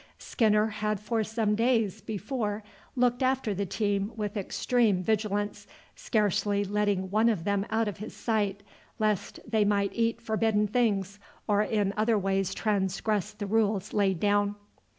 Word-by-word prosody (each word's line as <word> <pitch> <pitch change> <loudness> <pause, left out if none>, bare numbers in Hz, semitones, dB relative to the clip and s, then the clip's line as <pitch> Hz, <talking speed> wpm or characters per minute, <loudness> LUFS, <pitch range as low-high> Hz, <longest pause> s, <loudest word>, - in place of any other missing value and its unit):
Skinner 215 -3 +2
had 215 -1 -2
for 220 +1 -1
some 220 -1 0
days 225 -2 +1
before 215 0 -3 0.3
looked 245 0 +2
after 260 -4 +1
the 200 +1 -2
team 200 +1 -1
with 210 -1 -3
extreme 210 -1 +1
vigilance, 205 0 -1 0.3
scarcely 205 -2 +1
letting 200 -2 0
one 220 +3 +4
of 200 -8 -1
them 200 +1 0
out 225 0 +1
of 205 - -4
his 215 +3 -8
sight, 205 -3 -1 0.3
lest 215 -3 -1
they 220 -2 +2
might 200 -1 +1
eat 230 0 0
forbidden 220 -2 +1
things, 205 -3 0 0.3
or 205 -1 +3
in 210 -2 0
other 220 +1 +3
ways 195 -1 0
transgress 205 0 0
the 210 0 -6
rules 205 -1 0
laid 195 -4 +2
down. 205 +1 +2
210 Hz, 150 wpm, -28 LUFS, 200-220 Hz, 0.3 s, one